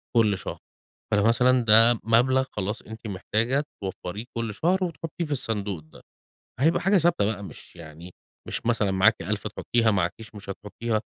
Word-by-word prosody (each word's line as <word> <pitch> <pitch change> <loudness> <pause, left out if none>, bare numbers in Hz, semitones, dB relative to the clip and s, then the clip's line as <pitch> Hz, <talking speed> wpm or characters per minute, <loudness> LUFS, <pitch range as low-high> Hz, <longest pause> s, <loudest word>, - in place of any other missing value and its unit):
كل 105 -4 +4
شهر، - - -6 0.5
فده 100 -1 +3
مثلًا 125 +2 +4
ده 115 +1 +6
مبلغ 125 +4 +3
خلاص 105 +1 -3
أنتِ 110 +1 -10
محتاجة 110 +8 0 0.2
توفريه 95 +3 -5
كل 115 -2 -2
شهر 185 - +1
وتحطيه 170 -1 -4
في 150 - -9
الصندوق 105 - -2
ده، 80 - -17 0.6
هيبقى 160 +4 +3
حاجة 195 +1 +3
ثابتة 165 -11 +2
بقى، 100 -1 -2
مش 90 +1 -12
يعني 85 +2 -11 0.3
مش - - -4
مثلًا 110 -4 +2
معاكِ 95 +4 +4
1000 105 +3 -3
تحطيها، 115 +1 +1
معاكيش 100 +4 -2
مش 100 -1 -8
هتحطيها، 110 +3 -3
110 Hz, 160 wpm, -25 LUFS, 100-120 Hz, 0.6 s, ده